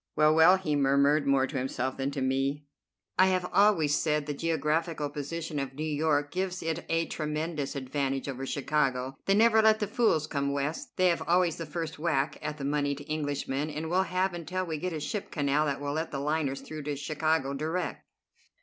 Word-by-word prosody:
"Well, 155 0 +5
well," 160 +4 +7
he 155 -6 -1
murmured, 140 +1 +3
more 135 -1 +4
to 135 0 -3
himself 130 0 -2
than 135 0 -1
to 140 -1 -4
me, 135 +2 0 0.5
"I 185 - +7
have 185 -1 +1
always 180 -8 +4
said 150 -2 0
the 145 - -3
geographical 155 0 -1
position 150 +1 -4
of 135 -1 -4
New 155 - -4
York 150 -1 +1
gives 185 -1 -2
it 165 +1 -2
a 165 0 +1
tremendous 155 -2 -3
advantage 135 0 -2
over 135 -1 -4
Chicago. 135 -2 0
They 195 - +4
never 220 +1 +5
let 220 0 +5
the 210 - 0
fools 210 - +2
come 140 -2 -1
West. 150 - -3
They 185 0 +4
have 170 - 0
always 175 -1 +3
the 165 - -5
first 165 0 -5
whack 150 -3 0
at 150 0 -4
the 140 - -5
moneyed 145 0 -1
Englishman, 145 -1 -2
and 155 +2 -4
will 185 +1 +4
have 185 +1 +1
until 175 +2 -3
we 160 -3 -4
get 180 +3 -2
a 160 - -3
ship 200 +7 -4
canal 145 0 +1
that 140 -1 -1
will 145 0 -3
let 160 +2 -2
the 140 - -4
liners 145 -1 -1
through 155 -1 -7
to 150 -1 -2
Chicago 155 0 0
direct. 160 +6 -3
150 Hz, 200 wpm, -29 LUFS, 140-165 Hz, 0.5 s, well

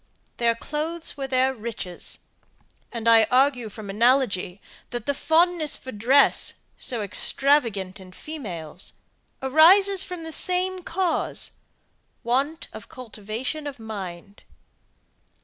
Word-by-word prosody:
Their 235 -1 +2
clothes 315 +6 -3
were 275 -2 -4
their 260 0 +2
riches; 215 -6 -6 0.7
and 230 -1 -4
I 225 -1 +7
argue 250 -1 +2
from 210 0 -10
analogy, 210 -4 +1 0.3
that 240 -2 -5
the 285 - +1
fondness 320 +1 +1
for 260 - -9
dress, 255 +7 +3 0.2
so 235 -4 -1
extravagant 210 -4 +2
in 185 -1 -13
females, 185 - -7 0.5
arises 370 +8 +6
from 360 -3 -7
the 325 - -6
same 365 +2 +1
cause 355 0 -1 0.7
want 270 +7 -1
of - - -10
cultivation 250 +5 -6
of 280 - -7
mind. 200 -3 -8
255 Hz, 115 wpm, -24 LUFS, 215-310 Hz, 0.7 s, I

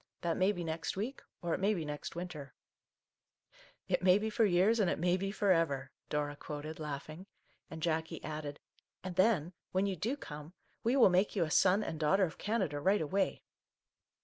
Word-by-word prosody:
That 170 -1 0
may 190 +2 +3
be 175 -4 -4
next 160 +2 -3
week, 235 +8 -3
— - - -57
or 170 -1 0
it - - -1
may 205 +2 +2
be 165 -4 -3
next 150 +2 -5
winter! 165 -7 -6 0.6
" - - -29
"It - - +1
may 185 +1 +6
be 220 +1 -2
for 225 +1 +3
years 200 +4 +4
and 195 -4 +3
it - - 0
may 175 +2 +2
be 195 +1 -2
for 205 -1 0
ever/' 140 -6 +1 0.2
Dora 145 -1 -1
quoted, 150 +2 -7
laughing, 155 +4 -6 0.4
and 160 -1 -7
Jackie 160 0 -1
added, 150 -1 -5
cc - - -38 0.2
and 185 -2 -5
then 185 -4 +3
— - - -61
when 190 +2 +2
you 195 -1 -1
do 230 - -2
come 150 - -9
— - - -40
we 235 +4 +2
will 255 -7 +7
make 185 +5 +2
you 185 - +3
a 155 - -3
Son 195 +6 +4
and 160 - -4
Daughter 190 +6 +3
of 165 - -2
Canada 190 -9 -1
right 195 +7 +3
away 190 +6 0
175 Hz, 215 wpm, -33 LUFS, 155-195 Hz, 0.6 s, will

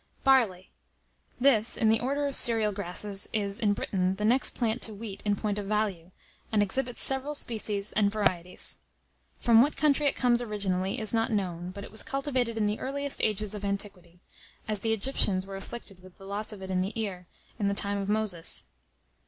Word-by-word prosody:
] - - -36
BARLEY. 225 -9 +3 0.7
This, 245 -4 +3
in 220 - +3
the 220 0 +4
order 280 +3 -1
of 280 - -1
cereal 225 -5 +2
grasses, 200 +1 -2
is, 200 -1 -1
in 210 -3 +2
Britain, 190 -2 -1
the 210 +2 -2
next 250 +4 +3
plant 230 -1 -1
to 220 - -1
wheat 200 -2 -7
in 205 -1 +2
point 210 0 -2
of 200 - -5
value, 200 -5 -1 0.4
and 210 -2 +4
exhibits 245 +5 -1
several 270 +2 +1
species 210 -5 -1
and 205 -1 +3
varieties. 185 -4 0 0.6
From 230 -1 +6
what 290 +4 +1
country 295 -1 +3
it - - +2
comes 245 -1 +3
originally, 195 -4 -1
is 220 0 0
not 225 0 +1
known, 180 -4 -2
but 200 +2 -8
it - - -10
was 220 - +4
cultivated 260 -4 -1
in 215 - +1
the 210 +1 -1
earliest 280 +1 -2
ages 210 -1 0
of 205 -1 -6
antiquity, 195 -3 -4 0.5
as 215 -2 +1
the 225 +3 -1
Egyptians 205 -4 +1
were 195 0 -7
afflicted 195 -1 -8
with 185 -1 -16
the 195 - -13
loss 205 +3 -3
of 200 -3 -9
it 190 - -5
in 185 -1 +1
the 200 +5 -3
ear, 185 -5 -4 0.3
in 205 - +1
the 200 - 0
time 200 0 +1
of 195 0 -3
Moses. 210 -6 +2
210 Hz, 200 wpm, -28 LUFS, 195-230 Hz, 0.7 s, From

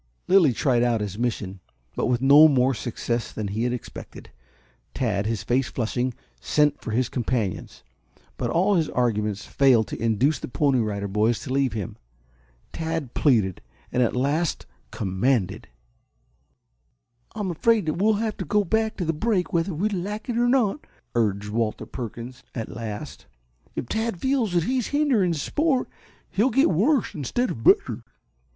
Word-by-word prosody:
Lilly 180 -7 +5
tried 120 0 +1
out 120 -2 +2
his 105 0 -4
mission, 105 -6 -2 0.4
but - - 0
with 125 0 0
no 145 +3 +8
more 135 -2 +3
success 120 0 -3
than 105 -2 -4
he 110 +4 -1
had 125 - 0
expected. 125 -2 -8 0.6
Tad, 105 -5 0
his 115 -2 -2
face 125 +1 +1
flushing, 120 +1 -2 0.2
sent 150 -1 +1
for - - -6
his 120 +3 +1
companions. 120 -6 -3 0.5
But - - -2
all 190 +5 +2
his 165 -5 +1
arguments 105 -4 -1
failed 130 -5 +4
to - - -6
induce 115 +7 +2
the - - -6
Pony 135 0 +1
Rider 100 -3 -2
Boys 105 +4 +1
to 130 - -4
leave 135 -2 +1
him. 105 -5 -5 0.8
Tad 160 -5 -3
pleaded, 110 - +2 0.3
and 125 - +1
at 120 - +1
last 145 +6 0 0.2
commanded. 105 +1 -1 1.7
"I'm 205 -4 -2
afraid 215 +2 +2
we 155 - -1
shall 215 +3 +4
have 215 0 -2
to - - -4
go 210 0 +2
back 220 +3 0
to 180 - -2
the 165 - 0
brake 180 +1 0
whether 170 +3 +1
we 190 +7 0
like 205 +2 -4
it 240 - -1
or 240 +1 +2
not," 250 -1 +2 0.3
urged 105 -3 0
Walter 110 0 -1
Perkins 120 +1 -7
at 115 -3 -4
last. 110 -3 -7 0.5
"If - - -4
Tad 220 - -2
feels 260 -6 0
that 175 -2 +2
he 255 +5 0
is 240 - -2
hindering 255 - +2
sport 270 - 0 0.4
he'll 220 +7 +2
get 270 +5 +3
worse 235 - +2
instead 170 - -1
of 115 - -7
better." - - +3
135 Hz, 165 wpm, -24 LUFS, -, 1.7 s, no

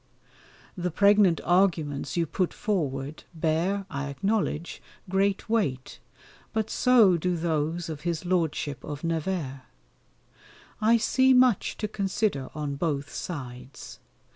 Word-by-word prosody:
The 180 -2 -2
pregnant 200 -1 +4
arguments 175 -6 +1
you 170 - +2
put 180 +3 -2
forward 145 -8 -2
bear, 165 +5 0
I 140 -5 -4
acknowledge, 195 0 -2 0.3
great 195 +1 0
weight, 145 - -1 0.5
but 220 -1 -1
so 230 -8 +5
do 180 +1 -1
those 165 +1 -1
of 155 -3 -6
his 170 0 -3
Lordship 160 -5 -1
of 145 0 -6
Nevers. 165 -4 -2 1.2
I 225 +2 +5
see 260 +3 +3
much 250 -5 +3
to 215 - -2
consider 195 - -1
on 145 -2 -3
both 145 -2 -2
sides. 130 -5 -7
170 Hz, 115 wpm, -27 LUFS, 145-200 Hz, 1.2 s, so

